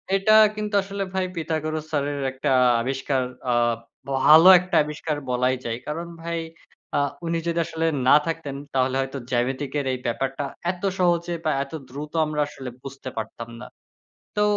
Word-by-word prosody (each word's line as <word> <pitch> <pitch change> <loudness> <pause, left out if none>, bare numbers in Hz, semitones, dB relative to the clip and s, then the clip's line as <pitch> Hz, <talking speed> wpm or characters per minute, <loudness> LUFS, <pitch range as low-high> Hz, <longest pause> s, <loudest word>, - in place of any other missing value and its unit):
এটা 195 +2 +3 0.2
কিন্তু 210 -1 -3
আসলে 195 0 -4
ভাই 190 -1 0
পিথাগোরাস 155 -1 -2
স্যারের 145 -1 -1
একটা 135 +2 -3 0.3
আবিষ্কার, 130 +1 -1 0.3
আ - - +3 0.6
ভালো 155 +6 +8
একটা 180 0 -4
আবিষ্কার 150 0 -4
বলাই 125 +1 +2
যায়। 115 0 -2
কারণ 165 +3 -4
ভাই 170 0 -3 0.6
আ - - +3 0.3
উনি 165 0 0
যদি 170 0 0
আসলে 165 0 -2 0.2
না 140 - +8
থাকতেন 165 -4 -3 0.2
তাহলে 130 0 +1
হয়তো 135 +1 -4
জ্যামিতিকের 135 +3 -1
এই 130 - -3
ব্যাপারটা 135 +4 -2 0.3
এত 180 +1 -12 0.2
সহজে 175 -1 +2
বা 155 - +3
এত 140 - -14 0.2
দ্রুত 145 +4 -7
আমরা 150 -1 -1
আসলে 135 -3 -8
বুঝতে 135 -1 -7
পারতাম 115 +1 -5
না। 125 - -7 0.7
তো 210 - +1
150 Hz, 155 wpm, -24 LUFS, 130-165 Hz, 0.7 s, ভালো